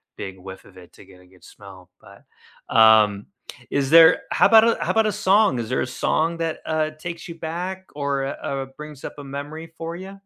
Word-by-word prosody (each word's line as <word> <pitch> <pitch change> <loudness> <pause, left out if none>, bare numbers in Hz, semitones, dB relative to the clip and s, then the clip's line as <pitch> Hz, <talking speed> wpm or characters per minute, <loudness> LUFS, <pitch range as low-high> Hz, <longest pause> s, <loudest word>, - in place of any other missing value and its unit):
big 95 -1 -8
whiff 95 +1 -11
of 95 - -18
it 90 -1 -16
to - - -17
get 90 -1 -18
a - - -20
good 90 0 -23
smell, 95 -3 -15
but, - - -18 0.5
um, 110 -2 +5 0.5
is 140 -1 0
there 165 +1 +7
how - - +4
'bout 220 -1 +7 0.2
a - - -2
how - - -1
'bout 225 -1 +2
a 215 - 0
song? 205 - +2
Is 115 -2 -4
there 130 - -1
a - - -2
song 165 +5 -1
that, 165 -1 -3
uh, 155 -1 -1
takes 170 +3 -8
you 170 - -7
back 180 +4 -5
or, 140 -1 -2
u 135 - -2 0.2
uh, 135 -1 -3
brings 150 -2 -11
up - - -7
a 145 - -9
memory 145 +4 -7
for 165 +1 -6
ya? 190 +2 -10
145 Hz, 220 wpm, -22 LUFS, 110-170 Hz, 0.5 s, there